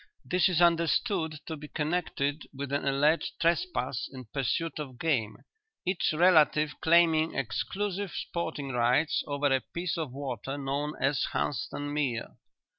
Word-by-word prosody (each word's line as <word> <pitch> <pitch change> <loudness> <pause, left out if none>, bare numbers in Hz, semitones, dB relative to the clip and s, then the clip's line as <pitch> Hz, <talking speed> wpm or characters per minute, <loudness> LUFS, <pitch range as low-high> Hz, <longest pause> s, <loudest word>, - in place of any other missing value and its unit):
This 180 0 +3
is 175 -1 +3
understood 170 -1 +2
to 160 - -4
be 150 0 -9
connected 150 -2 -1
with 140 0 -5
an 140 0 -1
alleged 150 +4 +2
trespass 170 - 0
in 130 -2 -9
pursuit 140 +6 -2
of 135 -5 -6
game, 125 -8 0 0.5
each 185 0 +1
relative 155 -2 +4
claiming 165 -1 +4
exclusive 200 - -2
sporting 160 -5 -4
rights 125 +6 +2
over 145 -1 +1
a 130 - 0
piece 175 0 -3
of 155 -5 -3
water 135 -1 -4
known 140 +2 -2
as 135 0 +1
Hunstan 145 +1 -2
Mere. 135 -6 -2
150 Hz, 135 wpm, -29 LUFS, 140-170 Hz, 0.5 s, relative